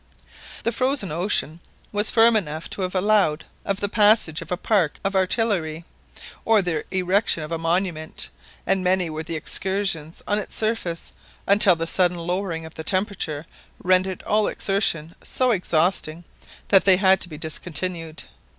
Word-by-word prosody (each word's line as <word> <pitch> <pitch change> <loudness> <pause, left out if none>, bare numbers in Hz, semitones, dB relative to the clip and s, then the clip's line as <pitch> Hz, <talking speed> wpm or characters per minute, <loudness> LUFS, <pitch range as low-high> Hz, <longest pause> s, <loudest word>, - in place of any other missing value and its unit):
The 230 - +1
frozen 255 - 0
ocean 170 -1 +1 0.3
was 210 +1 +2
firm 230 0 +5
enough 160 -6 -2
to - - -4
have 185 0 -3
allowed 190 -5 +2 0.2
of 200 0 -2
the 205 - +1
passage 205 -6 +3
of - - -10
a 180 - 0
park 185 -6 +1
of 195 0 -1
artillery, 185 -5 0 0.6
or 220 -1 +4
the 165 -4 -1
erection 185 -2 +1
of 155 - -8
a 165 - -2
monument, 165 - -2 0.3
and 190 -1 +1
many 180 -2 +2
were 155 0 -4
the 165 +1 -5
excursions 175 -1 -2
on 205 0 +1
its 210 - -6
surface 215 -7 -2 0.3
until 200 -2 +5
the 165 0 -3
sudden 180 +1 +1
lowering 170 -1 -3
of 160 - -11
the 160 - -7
temperature 185 -6 -1 0.4
rendered 185 +1 +2
all 210 0 +1
exertion 170 -5 0
so 255 -1 +1
exhausting 175 -3 0 0.5
that 195 -2 +6
they 190 -2 +7
had 190 0 +4
to 175 - -4
be 155 - -8
discontinued. 165 +1 -3
185 Hz, 160 wpm, -23 LUFS, 165-200 Hz, 0.6 s, they